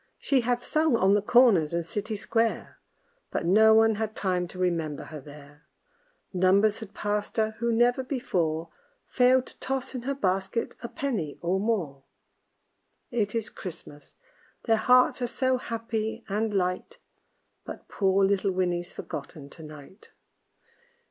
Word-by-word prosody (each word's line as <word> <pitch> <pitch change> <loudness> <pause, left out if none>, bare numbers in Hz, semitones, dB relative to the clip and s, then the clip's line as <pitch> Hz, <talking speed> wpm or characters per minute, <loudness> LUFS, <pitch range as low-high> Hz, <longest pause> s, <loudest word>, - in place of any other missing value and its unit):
She 270 -3 +1
had 245 +1 -1
sung 310 -2 +2
on 195 -3 +3
the 205 - +3
corners 205 -9 +4
and 170 -1 -1
city 210 +5 -4
square, 225 +2 -1 0.5
But - - -3
no 220 +5 +6
one 225 0 +5
had 220 0 -3
time 180 -2 -1
to 180 - -12
remember 165 -5 -1
her 155 -2 -9
there; 145 +1 -15 0.7
Numbers 195 +3 +3
had 220 -2 -10
passed 210 +1 -2
her 220 0 +2
who 235 0 0
never 240 +3 +2
before 170 - -2 0.4
Failed 255 0 +3
to - - -16
toss 265 0 -3
in 255 - -4
her 275 +3 -2
basket 195 0 -1
a 235 - -6
penny 210 - -3
or 180 +3 0
more. 185 -11 -1 1.1
It 220 -3 -1
is 225 -2 -2
Christmas; 160 -5 -10 0.5
their 225 -2 +3
hearts 250 +3 +4
are 245 - 0
so 260 +1 0
happy 225 -2 -4
and 215 +2 -1
light 185 - -2 0.7
But - - -9
poor 195 -1 +2
little 195 0 +1
Winnie's 175 -1 -1
forgotten 140 0 -8
to 165 - -13
night. 155 +5 -13
205 Hz, 150 wpm, -27 LUFS, 180-235 Hz, 1.1 s, no